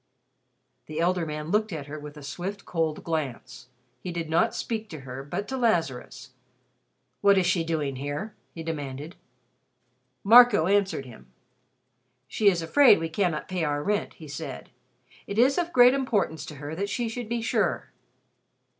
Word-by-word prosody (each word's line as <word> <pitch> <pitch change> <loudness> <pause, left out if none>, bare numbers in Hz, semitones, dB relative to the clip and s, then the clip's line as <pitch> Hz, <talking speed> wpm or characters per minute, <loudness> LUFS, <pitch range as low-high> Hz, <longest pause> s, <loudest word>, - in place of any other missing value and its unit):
The 155 +1 -5
elder 175 0 +1
man 150 +1 -5
looked 215 0 +1
at 155 -4 -5
her 150 +2 -7
with 150 0 -10
a 150 - -10
swift 180 +8 -6
cold 160 -3 -2
glance. 145 -6 -4 0.3
He 180 - -5
did 165 -2 -4
not 170 +8 +2
speak 220 -2 -4
to 155 -3 -8
her, 135 0 -7
but 175 +8 -4
to 265 - -3
Lazarus. 165 - -1 0.9
"What 200 -1 +5
is 185 - +3
she 170 -2 +2
doing 150 -5 -2
here?" 145 +10 -4 0.2
he 165 - -6
demanded. 150 0 -5 1.1
Marco 230 -4 +7
answered 195 -7 +1
him. 120 -3 -13 1.0
"She 210 - 0
is 175 -3 -1
afraid 240 - +6
we 165 0 -3
cannot 160 -2 -1
pay 185 -2 -2
our 145 -1 -1
rent," 210 +3 -1
he 155 - -11
said. 105 - -7 0.6
"It 200 - -5
is 265 +7 +4
of 345 0 -2
great 250 -3 +7
importance 220 - -1
to 150 - -8
her 145 +2 -7
that 200 +5 -3
she 240 +3 -1
should 225 0 -5
be 235 -1 -2
sure." - - 0
170 Hz, 165 wpm, -26 LUFS, 150-210 Hz, 1.1 s, Marco